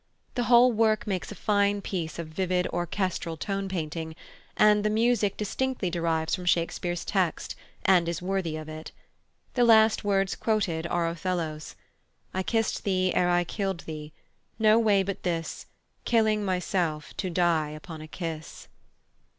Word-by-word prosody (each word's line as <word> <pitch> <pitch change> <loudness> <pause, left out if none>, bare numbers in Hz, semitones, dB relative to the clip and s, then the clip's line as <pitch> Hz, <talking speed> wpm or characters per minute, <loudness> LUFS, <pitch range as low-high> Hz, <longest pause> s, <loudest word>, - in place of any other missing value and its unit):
The 245 - -1
whole 245 +1 +6
work 220 -1 +2
makes 190 -4 -3
a - - -7
fine 205 -1 +2
piece 175 -5 -4
of 170 - -4
vivid 180 +2 0
orchestral 175 -1 -2
tone 195 +3 -3
painting, 160 -2 -4 0.4
and 210 -1 +5
the 215 - +2
music 220 -2 +2
distinctly 215 -2 -2
derives 165 -2 0
from 180 - -2
Shakespeare's 175 0 0
text, 185 -5 -1 0.3
and 180 -3 +4
is 170 - -2
worthy 180 -3 -2
of 155 0 -7
it. 155 0 -8 0.6
The 245 - +3
last 220 -1 +5
words 195 -1 +1
quoted 185 -7 0
are 170 -1 0
Othello's: 165 -3 -3 0.6
"I 190 - 0
kissed 225 +3 0
thee 185 -2 +1
ere 180 - +2
I 175 0 +3
killed 195 -1 -3
thee; 155 -1 -7 0.5
no 220 0 +5
way 205 -4 +3
but 195 0 -4
this, 165 -2 -3 0.4
Killing 220 -2 +2
myself, 180 -5 -1
to 185 - -2
die 170 -3 +2
upon 155 +1 -9
a 155 - -9
kiss." 160 -1 -7
185 Hz, 150 wpm, -27 LUFS, 165-210 Hz, 0.6 s, whole